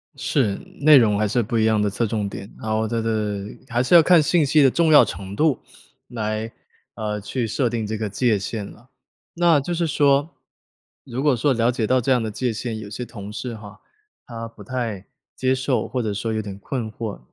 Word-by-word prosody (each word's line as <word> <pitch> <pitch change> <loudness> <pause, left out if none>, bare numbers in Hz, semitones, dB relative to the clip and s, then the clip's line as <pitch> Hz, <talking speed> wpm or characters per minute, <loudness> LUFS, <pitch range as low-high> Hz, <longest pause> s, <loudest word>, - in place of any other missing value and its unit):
是， 115 -9 0 0.3
内 150 0 +8
容 110 -5 +4
还 105 +1 +1
是 120 +4 +1
不 115 +1 -2
一 110 - +3
样 110 -1 +2
的 105 - +1
侧 115 +4 -1
重 105 -2 -2
点， 100 - -9
然 110 - -4
后 110 +1 0
这 115 +1 -1
个 105 -3 -2 0.2
还 120 -1 0
是 130 - +3
要 170 - +10
看 175 0 +6
信 155 +1 +2
息 150 +2 +4
的 135 - +6
重 165 +4 +2
要 150 - +8
程 100 0 -6
度， 155 +3 +2 0.5
来， 110 -1 -3 0.4
呃， 105 -1 -3
去 115 +3 -3
设 125 +3 0
定 115 -2 -2
这 110 +1 -3
个 110 - -2
界 110 +1 +1
限 105 +2 -4
了， 120 +5 -15 0.4
那 170 -3 +4
就 175 +6 -3
是 170 0 0
说， 145 0 +2 0.7
如 130 0 -5
果 145 -3 +3
说 140 +5 +1
了 120 -1 +2
解 120 -3 -2
到 130 +2 +3
这 130 +2 0
样 125 - +3
的 110 - -3
界 120 +3 -2
限， 110 0 -4
有 110 - -8
些 110 +4 -5
同 105 -3 -9
事 120 +1 -5
哈， 105 -1 -12 0.5
他 115 -1 -6
不 115 - -14
太 115 -7 -4 0.3
接 130 0 +1
受 130 0 -1
或 125 -1 -2
者 105 -2 -2
说 110 +3 -3
有 110 - -1
点 100 -1 -8
困 115 -1 -4
惑， 110 -1 -6
115 Hz, 240 characters per minute, -22 LUFS, 105-130 Hz, 0.7 s, 要